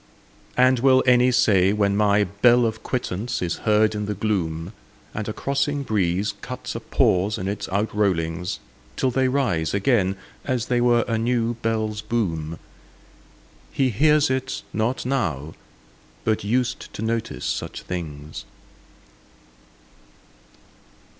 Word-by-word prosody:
And 130 0 +5
will 130 0 +5
any 125 0 +5
say 100 -6 +4
when 100 -1 +1
my 105 0 +3
bell 120 +6 +4
of 110 -1 -2
quittance 120 -2 -3
is 85 -2 -2
heard 105 0 +4
in 105 -1 -3
the 105 - -2
gloom, 90 -4 -2 0.4
And 105 +1 -4
a - - -1
crossing 140 +4 -1
breeze 100 -3 0
cuts - - -6
a - - -4
pause 95 +4 +1
in 95 - -4
its 100 +1 -3
outrollings, 95 -4 -1 0.4
Till 130 - +1
they 130 +1 +2
rise 105 - 0
again, 100 -2 +2 0.3
as 125 -4 -1
they 120 -1 +1
were 120 -1 +3
a 115 -1 0
new 120 0 +1
bell's 110 -1 -1
boom, 85 -10 -2 1.1
"He 130 -2 +1
hears 150 +5 +3
it 130 +1 -2
not 115 +4 -1
now, 80 - -1 0.7
but 110 - 0
used 120 +4 -1
to 105 - -4
notice 115 0 -2
such - - -3
things"? 75 -4 -6
110 Hz, 130 wpm, -23 LUFS, 95-125 Hz, 1.1 s, And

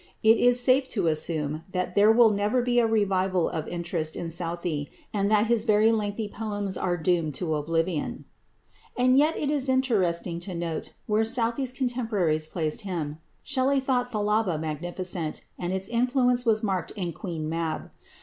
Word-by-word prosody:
It 220 +1 +6
is 245 0 +5
safe 255 +2 +4
to 190 - +1
assume 155 -1 -1
that 180 -1 -2
there 205 +3 +6
will 225 -1 +6
never 210 +5 +1
be 245 0 +2
a 230 - +3
revival 190 -5 +1
of 160 -3 -4
interest 170 -2 -3
in 165 -1 -4
Southey, 170 -3 -2 0.2
and 200 -1 +1
that 215 0 +4
his 230 -1 +1
very 215 0 +4
lengthy 215 -1 -1
poems 205 -2 -3
are 175 -1 -1
doomed 165 -3 0
to 160 +2 -2
oblivion. 165 +2 -2 0.7
And 255 +1 +4
yet 300 +4 +3
it 290 - -1
is 280 -3 +1
interesting 190 -10 +1
to 175 +1 -6
note 170 -2 -4
where 215 +1 +2
Southey's 235 +2 0
contemporaries 225 - -1
placed 155 0 -2
him. 160 -6 -4 0.2
Shelley 275 0 +1
thought 250 -2 0
"Thalaba" 210 -5 0
magnificent, 165 +1 -3 0.2
and 175 0 -2
its 190 0 -2
influence 245 +1 +1
was 220 -1 +3
marked 190 -5 -1
in 180 -5 -3
"Queen 160 -3 -5
Mab." 160 -1 -3
200 Hz, 165 wpm, -26 LUFS, 170-235 Hz, 0.7 s, It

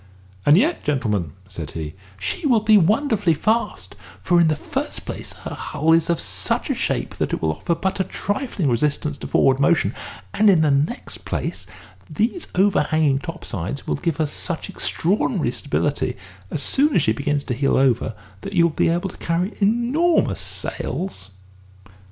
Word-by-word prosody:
"And 145 +3 +7
yet, 310 - +2
gentlemen," 105 - -1
said 85 -6 -7
he, 75 -1 -5 0.2
"she 95 - -2
will 235 -5 +4
be 215 0 +5
wonderfully 205 - +3
fast, 220 +9 -1 0.2
for, 175 -1 +3
in 165 - +5
the 155 - +2
first - - -4
place, - - -6
her - - -5
hull 155 +2 +1
is 165 0 +3
of 170 - +1
such 95 -2 -1
a - - +2
shape - - -2
that - - -1
it - - 0
will 80 - +2
offer 170 - -1
but 190 +4 -2
a - - +3
trifling 205 - -2
resistance 145 +4 0
to - - -6
forward 135 0 +3
motion; 170 +3 +3 0.4
and, 215 0 +5
in 180 -5 +5
the 155 -2 +3
next 145 - -1
place, - - -4 0.4
these 235 - -1
overhanging 155 -7 +3
top 165 +4 -7
sides 95 +10 -4
will, - - -1
give 165 0 -1
her 155 - +1
such 160 +3 -5
extraordinary 185 - 0
stability, 145 -1 -1 0.3
as 145 - -3
soon 290 +2 +2
as 160 - +4
she 110 - +2
begins 140 +4 -1
to 125 - -3
heel 135 +3 +1
over, 120 -4 +2 0.3
that 200 - -6
you 175 -3 +4
will 170 - +3
be - - +2
able 175 +3 0
to - - -13
carry 175 +5 -1
enormous 240 +11 +2
sails." 135 - -4
160 Hz, 175 wpm, -22 LUFS, 140-200 Hz, 0.4 s, And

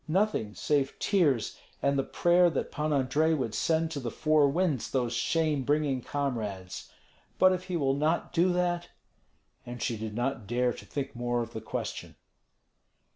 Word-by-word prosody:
Nothing, 160 - 0
save 140 +6 0
tears 150 - +1 0.2
and 140 0 +1
the 135 - +2
prayer 175 +4 +3
that 155 - -3
Pan 155 0 -2
Andrei 145 +4 +2
would 125 -7 -2
send 160 +5 +1
to 150 - -3
the 125 -3 -3
four 155 +2 +3
winds 160 -4 0
those 125 -3 0
shame 155 +2 +1
bringing 145 -1 +1
comrades. 110 -10 -4 0.5
But 185 0 +6
if 185 0 -4
he 180 -2 -2
will 135 -3 +1
not 155 +4 0
do 180 +2 +3
that 175 -1 0 0.7
And 120 0 -8
she 115 +1 -1
did 110 -1 -5
not 120 -3 -2
dare 120 +2 +1
to - - -11
think 140 -2 -4
more 120 0 -1
of 115 +1 -10
the 110 - -5
question. 110 - -5
140 Hz, 170 wpm, -29 LUFS, 120-160 Hz, 0.7 s, But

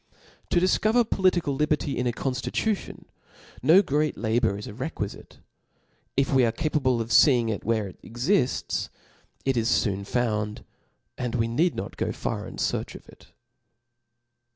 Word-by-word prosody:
To 175 - +3
diicover 215 +6 +3
political 180 -8 +2
liberty 150 0 0
in 125 - -1
a - - +2
confutation, 135 - -2 0.6
no 165 +9 +6
great 150 -1 0
labour 110 -2 +1
is 105 - -7
requifice. 110 -3 -6 0.8
If 135 +1 +2
we 130 -1 +5
are 115 - +3
capable 130 -2 0
of 115 0 -4
fee 135 0 +6
ing 115 -1 -1
it 105 - -3
where 110 -2 0
it 95 - -13
exifts, 125 - 0 0.6
it 135 -1 +2
is 115 0 +2
foon 100 -3 -2
found, 105 -1 -1 0.6
and 125 -2 -2
we 115 - +1
need 160 +10 +1
not - - -6
go - - -1
far - - -4
in - - -9
fearch - - -2
of - - -12
it. - - -17
125 Hz, 155 wpm, -26 LUFS, 115-155 Hz, 0.8 s, no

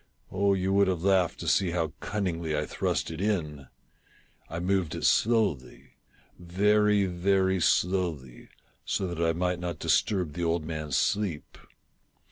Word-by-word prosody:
Oh, 100 +1 +2
you 95 +1 -1
would 100 0 +4
have 90 -3 -1
laughed 95 -3 +2
to - - -6
see 95 - +2
how 85 -2 -2
cunningly 85 -6 -2
I 75 - -1
thrust - - -2
it 80 +2 -6
in! 75 -10 -2 0.8
I 85 - -5
moved 90 -2 0
it - - -3
slowly 100 - +1 0.3
— - - -34
very, 105 +3 +2
very 95 +1 +1
slowly, 85 -10 -1 0.3
so 95 - -2
that 85 -2 -3
I 80 0 +2
might 90 +1 -1
not 90 -3 -4
disturb 90 -4 0
the 85 - -4
old 85 -1 0
man's 75 -3 -3
sleep. 100 -7 -1
90 Hz, 150 wpm, -27 LUFS, 80-95 Hz, 0.8 s, would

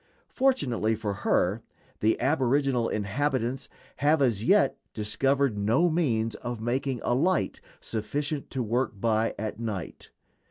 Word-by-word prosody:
Fortunately 130 - +1
for 105 -2 -3
her 100 +1 +1 0.4
the 110 +1 +2
aboriginal 135 -3 +2
inhabitants 130 +4 -1 0.3
have 150 +2 +3
as 115 -7 +2
yet - - +4 0.2
discovered 135 +2 +1
no 115 +12 +3
means 115 -9 +1
of 120 0 -5
making 125 +3 -1
a - - +1
light 175 +9 +1 0.2
sufficient 140 +7 -3
to 130 -2 -2
work 115 -2 -1
by 110 +1 +1
at 110 +1 -4
night. 105 -7 -5
120 Hz, 125 wpm, -27 LUFS, 110-140 Hz, 0.4 s, yet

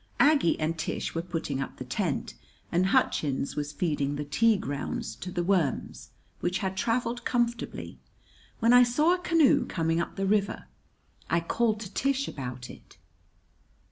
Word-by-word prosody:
Aggie 285 - +4
and 160 +1 -1
Tish - - -3
were 165 - -1
putting 165 -6 -3
up - - -6
the 130 - -7
tent, 155 +4 -2 0.4
and 180 +2 +2
Hutchins 140 -7 +1
was 145 0 -3
feeding 145 -2 -1
the 145 0 -4
tea 225 +8 +3
grounds 190 - -4
to 180 - -6
the 175 -1 -1
worms, 170 - -1 0.3
which 180 +1 0
had 190 -2 -2
traveled 235 +4 -1
comfortably, 240 -1 -2 0.6
when 230 +2 +4
I 245 - +9
saw 295 +8 +4
a 365 - -1
canoe 330 -5 +4
coming 165 0 0
up - - -5
the 195 - -1
river. 200 0 0 0.6
I 170 - +3
called 215 +5 0
to 200 -3 -8
Tish 275 0 0
about 125 -2 -6
it. - - -14
185 Hz, 160 wpm, -28 LUFS, 150-235 Hz, 0.6 s, I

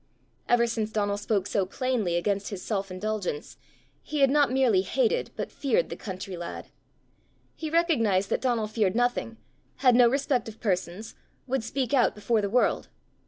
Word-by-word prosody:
Ever 240 -1 +4
since 225 -2 -2
Donal 205 -2 0
spoke 205 -1 -1
so 200 -1 0
plainly 215 -2 -1
against 200 +3 -1
his 200 -3 -6
self 195 -3 -2
indulgence, 185 -4 -4 0.4
he 300 -1 -3
had 270 -1 +5
not 290 -2 +3
merely 255 -7 +3
hated 475 - 0
but - - -4
feared 450 - 0
the - - -3
country 190 -1 -6
lad. 170 0 -7 0.9
He 315 - -5
recognized 230 - +2
that - - +1
Donal 240 -4 +1
feared 210 -2 0
nothing, 245 -1 0 0.4
had 255 -2 +4
no 240 -1 +6
respect 265 -3 0
of 220 - -13
persons, 190 0 -2 0.3
would 265 -2 -1
speak 255 +1 -2
out 260 - +3
before 215 +1 +1
the 200 - -1
world. 245 +4 +2
225 Hz, 165 wpm, -27 LUFS, 200-255 Hz, 0.9 s, no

